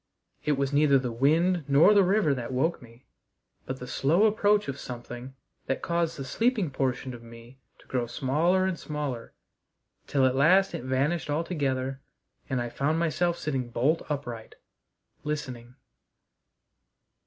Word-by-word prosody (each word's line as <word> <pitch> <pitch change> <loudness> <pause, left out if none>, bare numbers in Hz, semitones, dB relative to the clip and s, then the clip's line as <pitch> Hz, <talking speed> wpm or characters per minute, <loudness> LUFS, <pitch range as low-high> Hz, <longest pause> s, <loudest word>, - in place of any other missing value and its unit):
It 150 - +2
was 140 0 -1
neither 145 -1 +5
the 125 -2 -2
wind 160 +8 +2
nor 145 +9 +6
the 205 - +6
river 190 -5 +3
that 125 -2 -5
woke 145 +7 0
me, 120 +1 -17 0.6
but 130 - -4
the 125 - -8
slow 155 - +2
approach 210 -2 +3
of 140 0 -4
something 120 +1 -8 0.3
that 135 - -2
caused 170 -1 -1
the 135 - -5
sleeping 220 - 0
portion 130 -1 -2
of 120 - -10
me 115 +2 -14 0.2
to - - -21
grow 125 -2 -2
smaller 155 +9 +1
and 185 -3 -2
smaller 145 -6 -5 0.7
till 135 -2 +2
at 130 - +3
last 185 +8 +4
it - - -4
vanished 135 +4 0
altogether, 140 -4 -1 0.5
and 130 -2 0
I 120 - -2
found 140 +6 -1
myself 170 +1 0
sitting 130 -5 -3
bolt 140 +8 +1
upright 120 -6 -5 0.7
listening. 130 -5 -5
140 Hz, 150 wpm, -27 LUFS, 130-165 Hz, 0.7 s, nor